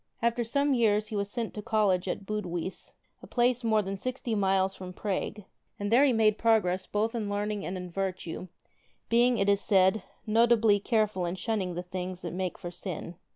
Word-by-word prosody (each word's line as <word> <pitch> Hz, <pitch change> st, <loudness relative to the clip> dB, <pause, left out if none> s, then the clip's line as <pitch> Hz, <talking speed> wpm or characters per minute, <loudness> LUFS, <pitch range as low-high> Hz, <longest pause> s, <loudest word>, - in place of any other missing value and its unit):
After 235 Hz, +1 st, +1 dB
some 280 Hz, +5 st, +1 dB
years 215 Hz, -3 st, +2 dB
he 215 Hz, -, -4 dB
was 200 Hz, 0 st, -1 dB
sent 230 Hz, 0 st, -3 dB
to 210 Hz, -, -5 dB
College 205 Hz, -5 st, +1 dB
at 195 Hz, -, -3 dB
Budweis, 185 Hz, -4 st, -4 dB, 0.3 s
a -, -, -11 dB
place 245 Hz, 0 st, +1 dB
more 220 Hz, -2 st, +3 dB
than 195 Hz, +1 st, -3 dB
sixty 255 Hz, +2 st, -3 dB
miles 195 Hz, -2 st, +2 dB
from 185 Hz, -1 st, -8 dB
Prague, 205 Hz, +2 st, -3 dB, 0.4 s
and 205 Hz, +1 st, -2 dB
there 250 Hz, +4 st, +6 dB
he 280 Hz, -, +5 dB
made 220 Hz, -2 st, +3 dB
progress 195 Hz, -5 st, +2 dB
both 220 Hz, +3 st, 0 dB
in 220 Hz, -4 st, -2 dB
learning 205 Hz, 0 st, -2 dB
and 185 Hz, -, -3 dB
in 180 Hz, -1 st, -7 dB
virtue, 185 Hz, -1 st, -4 dB, 0.6 s
being, 240 Hz, +1 st, +4 dB
it 195 Hz, -, +1 dB
is 200 Hz, 0 st, +3 dB
said, 190 Hz, +1 st, +4 dB, 0.2 s
notably 225 Hz, -1 st, +4 dB
careful 210 Hz, -4 st, 0 dB
in 175 Hz, -, -3 dB
shunning 190 Hz, -2 st, -2 dB
the 175 Hz, -, -3 dB
things 180 Hz, 0 st, -5 dB
that 170 Hz, -, -4 dB
make 185 Hz, 0 st, -3 dB
for 175 Hz, -2 st, -7 dB
sin. 175 Hz, -1 st, -6 dB
205 Hz, 195 wpm, -29 LUFS, 185-225 Hz, 0.6 s, there